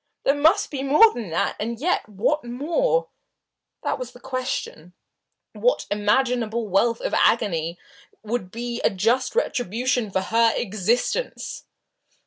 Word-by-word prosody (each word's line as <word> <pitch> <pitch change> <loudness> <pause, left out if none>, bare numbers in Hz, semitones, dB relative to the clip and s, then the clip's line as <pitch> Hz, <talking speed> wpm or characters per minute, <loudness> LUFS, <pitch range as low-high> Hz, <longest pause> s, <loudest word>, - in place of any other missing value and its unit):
There 275 - +4
must 320 +8 +3
be 275 -3 -3
more 300 +12 +6
than 225 -6 -6
that. 165 - 0
And 230 +2 -3
yet, 330 -6 0
what 230 +10 0
more? 335 - 0 0.7
That - - -1
was 250 -1 -6
the 245 - -14
question. 255 -10 -4 0.6
What - - +1
imaginable 225 +2 +1
wealth 225 +4 +2
of - - -3
agony 170 -7 +2 0.5
would 220 -3 -3
be 235 +3 -5
a - - +5
just 235 - 0
retribution 245 - 0
for 190 -1 0
her 230 +3 +3
existence? 235 - -1
240 Hz, 130 wpm, -23 LUFS, 210-270 Hz, 0.7 s, more